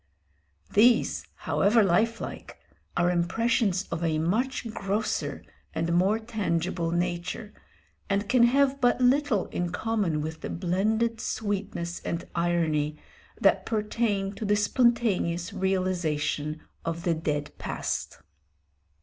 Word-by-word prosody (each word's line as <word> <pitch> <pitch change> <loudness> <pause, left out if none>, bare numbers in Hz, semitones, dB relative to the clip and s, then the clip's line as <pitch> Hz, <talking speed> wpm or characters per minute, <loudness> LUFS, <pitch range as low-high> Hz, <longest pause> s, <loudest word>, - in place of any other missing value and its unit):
These, 235 +4 +4
however 215 +3 +3
lifelike, 215 +5 -1 0.4
are 175 0 +3
impressions 195 +2 +1
of 170 0 -2
a 160 -2 +1
much 230 +11 0
grosser 200 +3 -2 0.3
and 165 +1 0
more 190 +5 +3
tangible 185 -7 -1
nature, 175 +4 -2 0.6
and 200 +1 0
can 250 +2 +4
have 275 +2 +3
but 245 0 +3
little 255 -4 +3
in 175 -1 -2
common 195 -6 0
with 160 +1 -5
the - - -5
blended 220 +6 0
sweetness 195 -5 -3
and 170 - -4
irony 160 -3 0 0.4
that - - +3
pertain 210 -2 0
to 220 - -7
the 205 0 +2
spontaneous 210 -6 +1
realisation 175 -5 -1 0.2
of 165 0 -3
the 170 - +2
dead 150 -2 -2
past. - - -4
190 Hz, 115 wpm, -27 LUFS, 170-225 Hz, 0.6 s, These